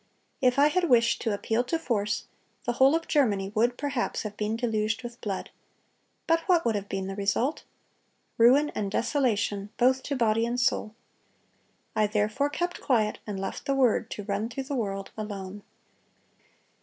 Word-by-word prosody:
If 250 0 +3
I 290 +2 +6
had 350 +1 +1
wished 235 -2 +4
to 225 - 0
appeal 225 +3 0
to 330 - 0
force, 215 -9 -1 0.4
the 240 - 0
whole 265 +5 +5
of 330 0 -2
Germany 205 -10 +1
would 240 +3 +2
perhaps 280 -4 -2
have 210 -1 -6
been 210 +1 -1
deluged 225 0 -1
with 240 +1 -8
blood. 200 -4 -4 0.7
But 330 0 +3
what 350 -5 +3
would 230 - +2
have 200 -1 -4
been 195 -1 -2
the 195 0 -5
result? 205 +8 0 0.7
Ruin 270 +6 +6
and 200 -2 -3
desolation 210 -4 0
both 260 +1 +3
to 285 - -3
body 225 -2 +2
and 240 +1 -1
soul. 220 -3 0 1.0
I 215 -1 +3
therefore 215 +7 0
kept 350 +4 -3
quiet, 220 -6 +1
and 200 -2 -4
left 195 0 -5
the 275 - +2
Word 245 -4 +2
to 205 - -6
run 205 +2 -2
through 270 +3 -4
the 275 +1 -4
world 195 -5 -3
alone." 205 -2 -6
230 Hz, 170 wpm, -27 LUFS, 210-265 Hz, 1.0 s, I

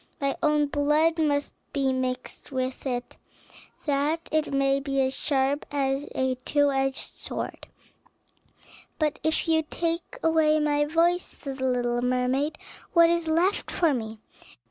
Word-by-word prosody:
My 275 -2 0
own 300 -1 +3
blood 300 +3 +2
must 290 -2 +1 0.2
be 270 -2 +1
mixed 255 +2 -4
with 260 0 -3
it, 245 -1 -4 0.7
that 300 +3 0
it 310 -1 +1
may 275 0 +2
be 275 0 -2
as 260 0 +1
sharp 275 0 0
as 275 0 -1
a 260 -1 0
two 290 -1 +2
edged 270 0 -2
sword." - - -5 1.3
"But 305 -1 0
if 315 +1 0
you 320 -1 +4
take 335 +6 -3
away 315 -1 +4
my 295 -1 +2
voice," 335 +3 +2
said 275 -6 -8
the 260 - -1
little 240 -1 0
mermaid, 255 +5 0 0.4
"what 335 -2 +6
is 340 -1 0
left 340 +6 +1
for 330 -4 +2
me?" 220 -3 -4
285 Hz, 145 wpm, -26 LUFS, 265-315 Hz, 1.3 s, what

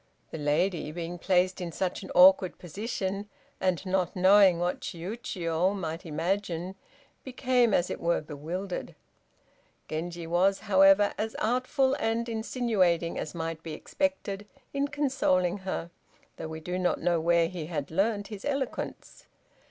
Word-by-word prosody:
The 160 - -5
lady 155 +2 0
being 170 +1 -5
placed 185 +1 +2
in 175 -1 -4
such 185 +2 -2
an - - -9
awkward 185 0 +6
position, 200 +2 -4 0.3
and 185 0 0
not 185 -2 0
knowing 190 -1 +6
what 175 +1 -1
Chiûjiô 180 -1 -2
might 165 -1 -5
imagine, 175 +2 -2 0.5
became, 250 -2 +2
as 175 -2 +2
it - - -5
were, 170 0 +2
bewildered. 165 +6 -5 0.9
Genji 170 +2 -4
was, 180 +4 +2
however, 195 0 +5
as 220 +1 -2
artful 255 +3 +1
and 225 +1 0
insinuating 220 -7 0
as 155 - -5
might 165 -1 -4
be 160 -1 -6
expected 205 - -2 0.3
in 280 0 0
consoling 255 -11 +1
her, 185 -3 -4 0.5
though 160 - -5
we 160 0 -7
do 180 +3 -3
not 180 -1 +1
know 170 -1 +1
where 170 0 +3
he 165 -3 -6
had 150 -4 -4
learnt 200 +3 0
his 210 -3 -8
eloquence. 275 -3 -4
185 Hz, 140 wpm, -28 LUFS, 170-205 Hz, 0.9 s, awkward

